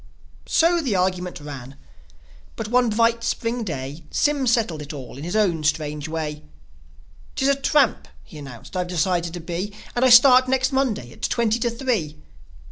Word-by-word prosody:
So 340 +1 +3
the 250 -10 -1
argument 180 -1 -1
ran; 140 -3 -9 0.8
but 220 -1 -5
one 245 0 +3
bright 230 +1 +2
Spring 230 +1 -2
day 145 -4 -6
Sym 290 -3 +1
settled 220 -10 +1
it 150 +1 -8
all 130 -5 -9
in 140 - -8
his 175 +5 -4
own 180 -7 +1
strange 150 -1 -1
way. 155 -2 -4 0.9
"'Tis 270 - +1
a - - +5
tramp," 275 -2 +1 0.2
he 155 - -12
announced, 135 +2 -11
"I've 180 -1 -1
decided 175 0 0
to - - -5
be; 180 +5 -5 0.2
And 245 - +1
I 260 - +5
start 255 +1 +8
next 260 +1 +1
Monday 245 - -1
at - - -16
twenty 230 0 +1
to 235 - 0
three 235 - -2
195 Hz, 170 wpm, -23 LUFS, 155-245 Hz, 0.9 s, start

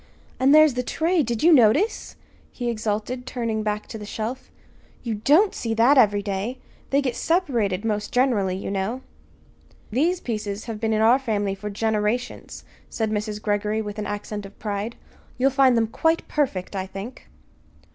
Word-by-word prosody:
And 265 +2 +4
there's 310 -2 +7
the 250 - -1
tray 330 +7 +1
did 235 -2 -2
you 340 +1 +7
notice?" 270 - +3 0.4
he 240 -1 -3
exulted, 220 +3 -3
turning 230 -3 -2
back 210 0 -2
to 220 - -7
the 210 - -7
shelf. 230 +5 -5 0.5
"You 235 -3 -2
don't 300 - +3
see 225 -1 -3
that 240 +6 +5
every 205 -6 +4
day! 200 +5 -3 0.3
They 280 +1 +2
get 255 -3 -1
separated, 235 - 0
most 210 -2 -2
generally, 230 -8 +2
you 195 - -5
know." 200 +6 -2 0.9
"These 330 +10 +1
pieces 210 - -4
have 225 -3 -5
been 225 0 0
in 215 0 +1
our 235 +4 +5
family 205 -6 -1
for 210 +2 -6
generations," 220 +3 -2 0.3
said 220 -2 -2
Mrs. 210 0 -2
Greggory 210 +1 -1
with 210 0 -6
an 210 - -3
accent 205 0 -5
of 195 0 -12
pride. 210 +2 -4 0.4
"You'll 265 +2 +3
find 265 -2 +4
them 225 - +3
quite 320 +9 0
perfect, 210 -11 -1
I 190 0 -3
think." 200 +7 -9
225 Hz, 170 wpm, -24 LUFS, 210-255 Hz, 0.9 s, there's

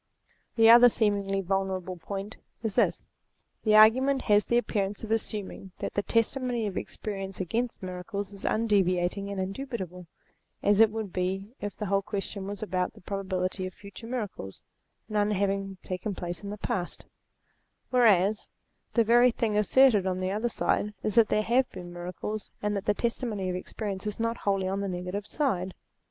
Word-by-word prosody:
The 225 -1 +6
other 240 +2 +9
seemingly 200 -3 0
vulnerable 190 -1 -2
point 195 +4 -6 0.3
is 220 -3 -1
this. - - +2 0.6
The 215 -1 +4
argument 260 +6 +6
has 210 -1 +4
the 235 - +2
appearance 205 -4 -1
of 220 - -5
assuming 205 -4 -3
that - - -4
the 205 - +1
testimony 235 +2 0
of 200 -3 -3
experience 195 -2 -5
against 225 +5 -2
miracles 195 +3 -5
is 200 - -11
undeviating 200 -3 +1
and 200 -1 -4
indubitable, 190 -4 -5 0.6
as 205 0 +4
it 225 -1 +7
would 215 -3 -5
be 190 +4 -2
if 205 -1 -5
the 210 - -3
whole 195 0 +2
question 200 -1 -4
was 205 +1 -5
about 185 -3 -1
the - - -16
probability 185 -1 -2
of 185 - -10
future 200 +3 -11
miracles, 210 - -5 0.4
none 210 -1 +1
having 195 -1 -1
taken 190 +2 -4
place 175 -1 -5
in 200 - -6
the 210 - -5
past; 180 -3 -3 0.9
whereas 215 -4 +4 0.5
the 230 - +5
very 240 +3 +6
thing 225 -2 -1
asserted 210 -1 +5
on 185 0 -1
the 185 0 -1
other 215 +4 0
side 210 -2 0
is 215 - 0
that 225 0 +6
there 215 - +2
have 250 +4 +2
been 175 -2 -9
miracles, 180 +4 -5
and 210 0 -1
that 200 - -3
the 210 - +2
testimony 225 -5 -2
of - - -3
experience 195 +1 -4
is 210 - -4
not 230 +1 0
wholly 195 -2 0
on 195 +1 -1
the 200 - -2
negative 180 +3 -4
side. 190 -11 -1
200 Hz, 170 wpm, -28 LUFS, 190-220 Hz, 0.9 s, other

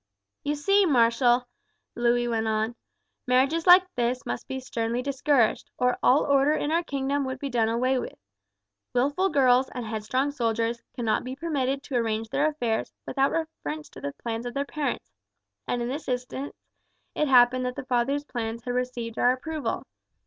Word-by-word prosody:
"You 290 +1 0
see, 395 +6 +3
marshal," 240 -2 +3 0.5
Louis 240 0 +1
went 225 -1 -1
on, 220 +1 0 0.5
"marriages 275 +7 +2
like 360 +1 +9
this 245 +1 -1
must - - -4
be 265 - -4
sternly 240 -1 -2
discouraged, 275 -3 +1
or 250 -1 +1
all 270 +4 +5
order 280 +1 +3
in 300 -1 -1
our 335 +1 +3
kingdom 280 -2 -1
would 260 0 -4
be 275 +1 -5
done 230 -2 +2
away 255 +3 +1
with. - - -7 0.8
Wilful 285 +10 +2
girls 260 -4 +4
and 245 -2 -6
headstrong 230 +6 -1
soldiers 230 -3 -1
cannot 230 -3 0
be 255 +1 -5
permitted 275 -3 -1
to 270 -3 -2
arrange 225 -1 -1
their 290 +6 +2
affairs 235 -7 -2
without 270 0 +1
reference 155 - -4
to - - -12
the 140 - -4
plans 230 +5 -4
of 245 - -7
their 280 0 0
parents, 280 - -3 0.6
and 240 -1 -1
in - - -2
this 280 +5 -5
instance 250 +2 -4 0.6
it 300 - 0
happened 255 -1 +5
that 250 - -4
the - - -6
father's 265 +3 0
plans 230 -3 -4
had 245 - -3
received 245 -2 -3
our 245 - +5
approval. 310 +3 -4
250 Hz, 170 wpm, -26 LUFS, 235-280 Hz, 0.8 s, like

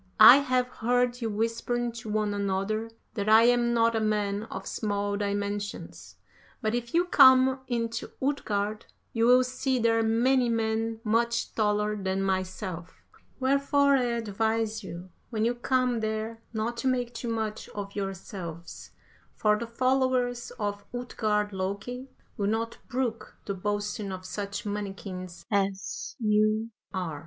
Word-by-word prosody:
I 220 +4 +11
have 255 -3 +1
heard 245 +1 0
you 225 - -1
whispering 230 +3 -1
to 230 -1 -8
one 210 -1 0
another 200 +3 -1 0.2
that 210 -2 -2
I 220 +1 +8
am 240 0 +4
not 230 -1 +3
a - - +2
man 210 -1 0
of - - -7
small 205 -1 -1
dimensions; 205 0 -4 0.4
but 215 0 -1
if 240 +3 -3
you 350 +1 +4
come 260 -4 +6
into 230 -1 -2
Utgard 215 -6 -1 0.3
you 230 0 +2
will 250 +1 +7
see 255 +1 -1
there 225 -1 +3
many 240 +3 +3
men 225 0 -1
much 235 +1 +1
taller 210 -1 +1
than 195 -1 -1
myself. 185 -2 -3 0.4
Wherefore 280 +1 +3
I 255 -2 +2
advise 225 -1 -1
you, 180 0 -8 0.2
when 220 -2 0
you 240 - +2
come 250 0 +1
there, 220 +1 -3
not 230 +1 -2
to 265 - -1
make 245 -2 0
too 235 0 -4
much 220 -2 -3
of 200 -1 -7
yourselves, 190 -4 -6 0.5
for 210 -1 +3
the 235 - -4
followers 255 0 +1
of 205 -2 -3
Utgard 210 -4 -1
Loki 200 +8 -4 0.3
will 200 -2 0
not 225 +2 -1
brook 235 -4 -3
the 200 - -2
boasting 205 +1 -2
of 185 0 -7
such 200 +2 -5
mannikins 195 -3 -5
as 195 -1 -1
ye 215 0 +2 0.2
are. 170 -6 -3
220 Hz, 145 wpm, -28 LUFS, 205-240 Hz, 0.5 s, I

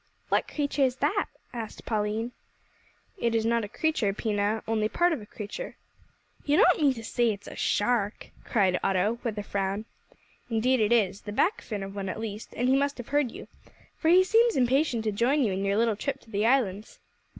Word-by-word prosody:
"What - - +2
creature 285 -1 -2
is 255 -2 +3
that?" 300 +10 0 0.3
asked 230 -3 -7
Pauline. 215 +2 -1 0.9
"It 230 -1 +1
is 225 -1 +1
not 230 0 +2
a - - -3
creature, 280 -7 0
Pina, 210 0 -1
only 215 -1 +1
part 345 +6 +2
of 295 - -4
a 210 - -11
creature." 215 - -7 0.7
"You 295 +1 +2
don't 360 -3 +5
mean 280 -3 +4
to 225 - -8
say 235 +1 +1
it's 205 -1 -7
a - - -8
shark!" 210 -1 0
cried 190 -5 +2
Otto, 195 +5 +1
with 225 -3 -3
a 205 - -3
frown. 200 +1 -2 0.6
"Indeed 245 +3 +2
it 215 0 +2
is 205 -4 +2
the 205 - -7
back 345 - +1
fin 205 -3 -5
of 195 0 -7
one 195 -1 -4
at 200 - -4
least 215 -1 -6
and 245 - +1
he 260 - +4
must 280 +1 +1
have 245 - -8
heard 290 -4 +1
you, - - -10 0.5
for 320 - 0
he 365 +2 +7
seems 455 +4 +3
impatient 255 -1 +2
to 215 - 0
join 255 +8 +2
you 205 -5 +1
in 190 +1 -2
your 200 +1 +1
little 225 -1 +2
trip 275 +5 -3
to 225 - -19
the 210 +1 +1
islands." 220 -5 0
225 Hz, 205 wpm, -27 LUFS, 205-270 Hz, 0.9 s, he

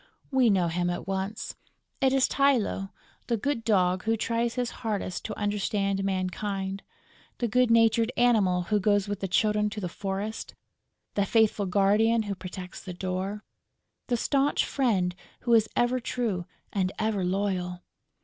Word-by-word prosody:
We 260 -3 +4
know 185 -4 +3
him 175 +1 0
at 175 - -3
once. 195 +3 -3 0.5
It 265 -1 +4
is 270 -1 +3
Tylô, 250 -8 +1 0.4
the 235 - +1
good 250 +1 -1
Dog 185 -3 +2
who 225 0 +2
tries 230 +1 -1
his 250 -2 -1
hardest 210 -5 -2
to 215 - -5
understand 200 -1 0
mankind, 195 +1 -2 0.6
the 240 - 0
good 250 +2 +3
natured 230 0 +4
Animal 205 -7 +3
who 210 +4 +1
goes 205 0 +2
with 205 -1 -3
the 195 - -2
Children 210 +2 +2
to 210 - -6
the 185 - -3
forest, 195 +4 -4 0.6
the 200 - +2
faithful 215 -2 +3
guardian 210 +4 +3
who 205 -1 -3
protects 185 -1 -8
the 185 - -6
door, 190 +3 -3 0.6
the 245 - +1
staunch 275 +4 +1
friend 200 -10 +1 0.3
who 240 - +1
is 220 -2 +5
ever 245 +1 +2
true 225 -8 -2 0.3
and 190 -2 0
ever 215 -3 0
loyal! 180 -1 -1
205 Hz, 155 wpm, -27 LUFS, 190-230 Hz, 0.6 s, is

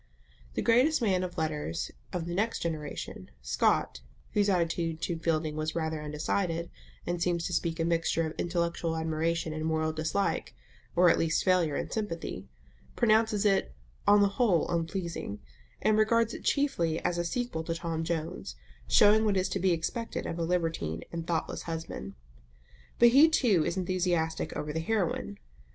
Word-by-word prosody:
The - - -1
greatest 255 +7 +4
man 190 -4 +2
of 180 -1 -5
letters 150 - -2 0.2
of 170 -2 -3
the 170 - -4
next 220 +5 -1
generation, 155 -3 -5
Scott - - +1 0.3
(whose 205 -1 +2
attitude 165 -3 0
to 170 -2 -2
Fielding 155 -2 0
was 155 0 -2
rather 160 -2 -2
undecided, 165 +3 -2 0.3
and 175 -1 -2
seems 170 -1 0
to 180 - -3
speak 165 0 -1
a 165 - +1
mixture 165 0 +1
of 160 - -4
intellectual 170 -1 -1
admiration 160 0 -1
and 155 0 -4
moral 160 0 0
dislike, 160 +5 -1 0.4
or 175 0 +6
at - - +1
least 160 -1 +1
failure 180 -5 +3
in - - -3
sympathy), 165 - -4 0.5
pronounces 220 -2 +3
it 195 - +2 0.3
"on 205 0 +7
the - - +5
whole 195 -10 +3
unpleasing," 170 - -3 0.4
and 215 0 +4
regards 230 +1 +3
it - - -8
chiefly 175 - +1
as 175 0 +1
a - - +1
sequel 205 -3 -2
to 165 - -2
Tom 165 -1 -3
Jones, 165 +1 -4 0.3
showing 215 +1 +6
what 205 -3 +2
is 185 - +1
to 195 - -2
be 185 0 +2
expected 175 +8 -2
of 165 - -4
a - - 0
libertine 165 - -1
and 165 -1 -5
thoughtless 165 -2 -2
husband. 160 - -5 0.8
But 240 - +7
he 285 +7 +7
too 215 - +3
is 170 - -2
enthusiastic 175 -3 0
over 150 0 -3
the 160 - -1
heroine. 200 +2 -1
170 Hz, 165 wpm, -29 LUFS, 160-195 Hz, 0.8 s, on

